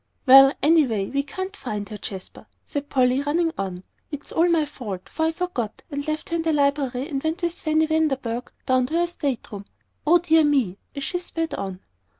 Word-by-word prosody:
"Well, 270 0 +9
anyway, 270 -11 +3
we 280 - +1
can't 375 +8 -6
find 210 - -5
her, 210 - -6
Jasper," 190 -2 -8 0.2
said 285 0 -4
Polly, 255 0 +3
running 325 +4 +1
on. 195 - -2
"And 180 - -11 0.3
it's 290 -1 -7
all 340 +2 +3
my 330 -3 +3
fault, 205 -10 -7
for 320 0 -1
I - - +1
forgot, 325 - -4
and 285 +1 -4
left 310 0 -3
her 335 - 0
in - - -1
the 325 -1 +1
library, 280 -2 +1
and 275 -5 -3
went 320 +4 -2
with 340 0 -1
Fanny 315 0 +2
Vanderburgh 270 -7 -1
down 255 -1 +2
to 315 - -3
her 345 +1 +3
state 290 -7 -3
room. 200 -1 -7 0.4
O 345 +3 +7
dear 325 -2 +4
me!" 265 -11 +1 0.2
as 280 - -4
she 355 +6 -1
sped 330 -2 -3
on. 190 -1 -5
285 Hz, 205 wpm, -24 LUFS, 250-320 Hz, 0.4 s, Well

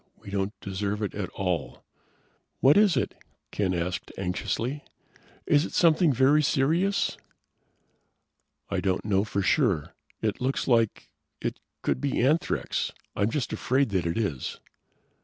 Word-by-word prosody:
We 100 - -11
don't 100 +1 -2
deserve 100 +2 -2
it 105 - -2
at 100 -2 -3
all." 90 -3 -3 0.8
"What 135 +3 +6
is 205 -8 +5
it?" - - 0 0.4
Ken 100 -3 0
asked 90 +2 -3
anxiously. 115 +9 -2 0.6
"Is 145 0 +4
it - - -6
something 165 -1 +4
very 135 +4 +4
serious?" 160 +8 +1 1.5
"I - - -1
don't 95 +1 -1
know 100 -2 +2
for 100 -2 -2
sure. 95 - +2 0.3
It 105 0 -2
looks 130 +2 -1
like 115 -4 +2 0.3
it - - -3 0.2
could - - 0
be 140 - 0
anthrax. 145 +7 +1 0.2
I'm 100 - +1
just 135 0 -2
afraid 130 +1 +1
that 95 -4 0
it 85 - -1
is." 95 - -2
110 Hz, 140 wpm, -27 LUFS, 95-140 Hz, 1.5 s, What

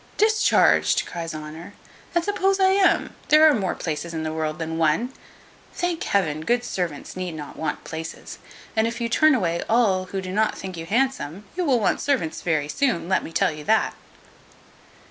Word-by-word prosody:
"Discharged!" 435 +1 +3
cries 165 -2 -5
Honour; 155 +5 -9 0.4
"and 345 - +3
suppose 390 0 +1
I 380 0 +5
am: 385 0 +3 0.2
there 310 +1 +7
are 305 - +6
more 195 -7 -1
places 165 +1 -4
in 160 - -3
the 155 0 -3
world 155 -1 -2
than 160 0 -4
one. 165 +12 +1 0.6
Thank 350 -1 -2
Heaven, 155 -7 0
good 240 +8 +1
servants 175 -10 -4
need 185 -2 -4
not 150 -2 -8
want 155 -2 -3
places; 160 0 -7 0.4
and 220 0 +2
if 230 +1 -4
you 235 - -1
turn 310 +5 +4
away 170 -7 0
all 205 -5 +3
who 195 +1 -4
do 185 -1 -5
not 215 +2 +1
think 190 -1 -6
you 165 0 -7
handsome, 215 - -1
you 360 -1 -1
will 260 -5 +3
want 210 - +1
servants 245 - -1
very 155 -4 0
soon; 170 - 0
let 185 - +1
me - - -8
tell - - +2
you 150 -1 -8
that." 220 0 +2
185 Hz, 185 wpm, -23 LUFS, 160-255 Hz, 0.6 s, there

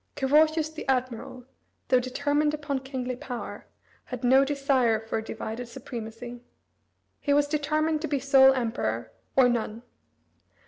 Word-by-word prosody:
Carausius 310 +3 +3
the 310 - -7
admiral, 250 -1 -2 0.4
though 255 - +5
determined 290 +4 0
upon 290 -2 -3
kingly 260 -1 -4
power, 245 -1 -7 0.4
had 250 -1 -7
no 260 +2 +6
desire 275 -5 +2
for 225 0 -3
a - - -6
divided 225 +2 -5
supremacy. 240 -1 -8 0.8
He 285 - +1
was 290 0 +4
determined 305 +1 0
to 315 - -2
be 280 -1 0
sole 265 0 +6
emperor, 225 - -2 0.2
or 260 -2 +6
none. 230 -1 -2
265 Hz, 135 wpm, -27 LUFS, 240-290 Hz, 0.8 s, no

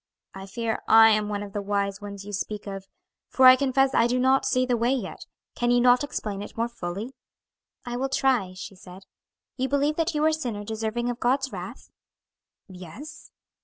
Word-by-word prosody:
"I 195 0 -9
fear 225 +2 -3
I 225 0 +7
am 210 -1 +1
one 205 -1 -3
of 200 -1 -10
the 205 - -2
wise 200 0 -2
ones 200 -1 -8
you 205 - -8
speak 210 +1 -4
of, 195 -1 -7 0.4
for 260 - +3
I 255 0 +10
confess 270 0 +1
I 230 - +4
do 245 +1 0
not 260 +1 +2
see 255 0 +2
the 250 -1 +1
way 235 +2 +1
yet. 245 -8 -4 0.3
Can 240 - -1
you 245 0 +4
not 245 +2 +4
explain 210 -8 -4
it 205 - -10
more 230 +1 0
fully?" 205 +1 -6 0.7
"I 245 0 -4
will 270 +2 -2
try," 250 -9 +1
she 185 - -8
said. 185 +1 -13 0.5
"You 260 0 -1
believe 285 +2 +1
that 330 0 0
you 300 - +1
are - - +5
a - - 0
sinner 240 -9 -4
deserving 225 +3 -2
of 245 - -8
God's 265 +2 0
wrath?" - - -9 0.8
"Yes." 195 - -11
235 Hz, 200 wpm, -25 LUFS, 205-260 Hz, 0.8 s, I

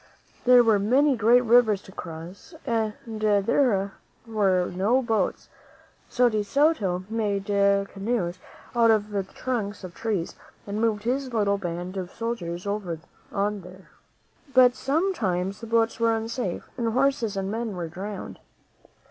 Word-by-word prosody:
There 250 -1 +7
were 220 -3 +4
many 265 +7 +3
great 235 +2 +5
rivers 230 -3 +5
to - - -13
cross 170 - -9
and 225 -4 0
there 215 -1 +1 0.3
were 195 -5 +1
no 215 +9 +2
boats; 225 -2 -1 0.6
so 245 0 +3
De 215 -3 +1
Soto 205 - +1
made 210 -3 -1
canoes 200 -1 0 0.4
out 230 -1 +5
of 215 -1 +2
the 200 -1 0
trunks 205 0 -4
of 180 -1 -8
trees 205 -6 -2 0.3
and 205 +1 -3
moved 215 -3 +1
his 260 +2 -1
little 205 -3 +1
band 175 +1 -5
of 185 -2 -4
soldiers 185 -7 -4
over 200 -5 -3 0.3
on 205 0 -1
these. 180 +2 -13 0.7
But 250 -1 +7
sometimes 240 - -1
the 230 - -7
boats 225 0 +1
were 230 -1 +3
unsafe, 225 -4 -4
and 230 -2 0
horses 250 -5 +1
and 195 0 -2
men 225 -2 -3
were 175 -2 -4
drowned. 190 +4 -7
210 Hz, 140 wpm, -25 LUFS, 195-235 Hz, 0.7 s, There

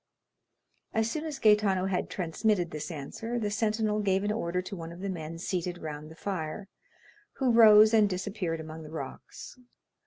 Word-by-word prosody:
As 225 +1 +1
soon 310 0 -3
as 305 -3 -4
Gaetano 210 -5 +3
had 190 -1 -1
transmitted 180 +1 0
this 150 +3 -5
answer, 180 +10 -5
the 210 -3 -1
sentinel 215 0 0
gave 195 -1 +1
an 205 - 0
order 180 -5 -1
to 185 +2 -5
one 165 -2 -7
of 170 - -10
the 200 - -3
men 165 -2 -6
seated 175 0 -3
round 155 -2 -7
the 160 - -12
fire, 185 +1 -4 0.7
who 260 -3 +1
rose 220 -1 +8
and 215 -2 +5
disappeared 185 -3 -3
among 160 0 -8
the 155 - -10
rocks. 160 - -8
195 Hz, 175 wpm, -29 LUFS, 165-215 Hz, 0.7 s, rose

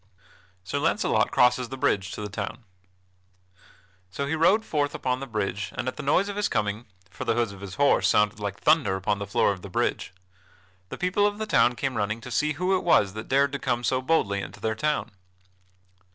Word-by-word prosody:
[Sidenote: - - -25
Sir - - -1
Launcelot - - +1
crosses 125 0 +3
the 135 - -6
bridge 100 -8 +1
to - - -6
the 105 - -4
town] 100 +4 -5 1.5
So 115 +10 -3
he 140 - -2
rode 190 +8 +3
forth 145 -2 -1
upon 125 0 -1
the 135 - -6
bridge 105 -3 -3
and 125 - -3
at 130 - -2
the - - -6
noise 180 +8 +2
of 205 0 -5
his 205 - 0
coming 105 +2 -2 0.2
(for 115 - -6
the 115 -3 0
hoofs 120 -4 0
of 100 -1 -12
his 100 -2 -7
horse 145 0 +3
sounded 105 0 +2
like 100 -1 -4
thunder 155 -11 +3
upon 95 +1 -1
the 100 - -5
floor 100 - +2
of 95 -2 -6
the 100 - -9
bridge) 90 - -1 0.8
the - - -6
people 190 +3 +2
of 205 0 -3
the 220 - -3
town 125 - +3
came 135 -1 -2
running 105 +1 -1
to 125 +1 -9
see 150 +4 +1
who 180 +5 +1
it 185 - -1
was 100 - +3
that 110 +1 -7
dared 140 +1 +3
to 140 - -4
come 120 -1 -1
so 130 +2 +1
boldly 115 -9 +1
into - - -9
their 110 - -1
town. 150 +7 -1
125 Hz, 220 wpm, -26 LUFS, 105-145 Hz, 1.5 s, crosses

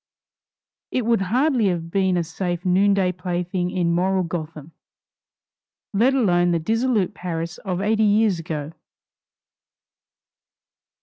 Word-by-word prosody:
It 250 -3 -1
would 230 -3 +2
hardly 245 +3 +2
have 170 -2 -2
been 190 -1 +1
a 175 - +1
safe 175 +2 -4
noonday 190 0 +3
plaything 180 0 -3
in 175 -2 0
moral 185 +2 +1
Gotham, 160 -2 -6 1.2
let 245 +7 +3
alone 175 -8 +3
the 170 - +2
dissolute 225 +3 0
Paris 170 -1 -5
of 185 -2 -3
eighty 215 +2 +1
years 210 -3 +3
ago! 155 -2 -5
180 Hz, 115 wpm, -22 LUFS, 170-205 Hz, 1.2 s, noonday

